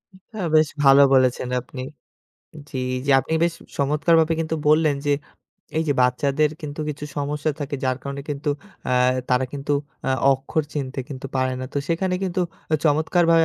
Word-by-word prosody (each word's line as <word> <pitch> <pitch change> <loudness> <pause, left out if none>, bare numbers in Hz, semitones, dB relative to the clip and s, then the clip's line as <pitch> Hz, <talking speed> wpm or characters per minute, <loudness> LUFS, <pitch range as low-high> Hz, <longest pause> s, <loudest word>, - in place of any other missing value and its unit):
এটা 190 +4 -15 0.2
বেশ 155 -1 +5
ভালো 135 0 +8
বলেছেন 130 -1 +3
আপনি 130 +1 -9 0.9
জ্বি, 135 - -5 0.2
এইযে 135 +2 +1
আপনি - - -6
বেশ 170 -1 0 0.2
চমৎকারভাবে 160 +3 +3
কিন্তু 160 0 -1
বললেন, 155 -1 +4
যে 145 - +3 0.7
এই - - +2
যে 145 - +4
বাচ্চাদের 140 +4 +2
কিন্তু 150 0 -5
কিছু 150 0 -5
সমস্যা 145 +1 -1
থাকে, 145 0 -3
যার 130 -1 +1
কারণে 140 0 -5
কিন্তু 145 0 -3 0.4
আ - - +2 0.4
তারা 125 +1 +3
কিন্তু 145 0 -2 0.4
আ - - +1 0.2
অক্ষর 135 +4 -1
চিনতে 135 -2 -4
কিন্তু 135 -2 -6
পারে 130 0 +1
না। - - -3
তো 145 - +1
সেখানে 180 +2 0
কিন্তু 185 -1 -1 0.4
চমৎকারভাবে 165 +2 +4
145 Hz, 160 wpm, -23 LUFS, 135-160 Hz, 0.9 s, ভালো